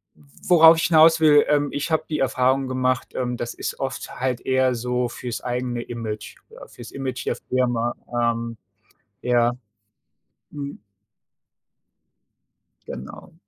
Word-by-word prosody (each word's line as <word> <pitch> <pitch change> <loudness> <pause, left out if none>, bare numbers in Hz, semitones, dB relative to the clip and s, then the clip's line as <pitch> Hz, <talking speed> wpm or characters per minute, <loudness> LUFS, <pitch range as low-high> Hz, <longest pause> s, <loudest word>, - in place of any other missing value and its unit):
w 75 - -23 0.2
worauf 165 -1 +8
ich - - 0
hinaus 160 0 +6
will, 150 -2 +6
ähm, 145 -1 +2
ich 145 +3 -3
habe 160 0 +2
die 150 - -2
Erfahrung 130 0 +1
gemacht, 130 0 -1
ähm, 125 -1 -2
das 120 - -4
ist - - -5
oft 135 -1 -5
halt 125 -2 -1
eher 130 -1 +2
so 125 +1 -1
fürs 120 -2 -6
eigene 125 -1 -3
Image, 115 -3 -6
ja, - - -13
fürs 120 - -12
Image 130 -2 -5
der - - 0
Firma, 120 -2 -1 0.2
ähm, 115 -1 -1 0.6
ja. 120 -1 +2 1.0
Hm. 140 -4 -7 2.1
Genau. 65 - -9
130 Hz, 135 wpm, -23 LUFS, 120-140 Hz, 2.1 s, worauf